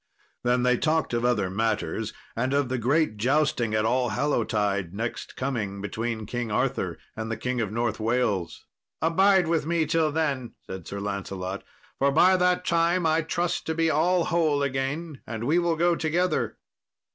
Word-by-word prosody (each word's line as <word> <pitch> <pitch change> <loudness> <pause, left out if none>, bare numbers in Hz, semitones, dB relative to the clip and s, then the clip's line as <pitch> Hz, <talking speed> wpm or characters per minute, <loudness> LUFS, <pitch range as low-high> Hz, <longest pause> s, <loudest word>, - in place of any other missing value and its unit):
Then 125 0 +2
they 125 -1 +3
talked 155 -2 0
of 120 0 0
other 115 -6 +2
matters, 110 +1 -1 0.2
and 130 +4 0
of 140 -3 +1
the 130 -1 -1
great 130 -1 +1
jousting 120 -2 +1
at 110 0 +1
Allhallowtide 105 - 0
next 115 +3 -4
coming, 110 -7 -3
between 110 +2 -3
King 120 +1 -3
Arthur - - -1 0.2
and 110 0 -4
the 115 - -2
King 125 +1 -2
of 105 -3 -2
North 115 -1 -1
Wales. 110 -6 -1 0.3
"Abide 190 +4 +4
with 160 -2 0
me 165 -1 +1
till 155 0 +1
then," 145 -6 -1
said 95 -3 -8
Sir 100 - -5
Lancelot, 100 -1 -4 0.4
"for 140 +1 +3
by 180 +6 +5
that 180 0 +2
time 170 0 +2
I 160 +1 +3
trust 170 +2 -2
to 160 - -1
be 165 0 +2
all 170 +4 +3
whole 155 -4 +2
again, 140 +3 -3
and 110 0 -4
we 155 +8 +3
will 170 -1 +1
go 170 +1 +3
together." 170 +3 0
130 Hz, 170 wpm, -26 LUFS, 110-160 Hz, 0.4 s, by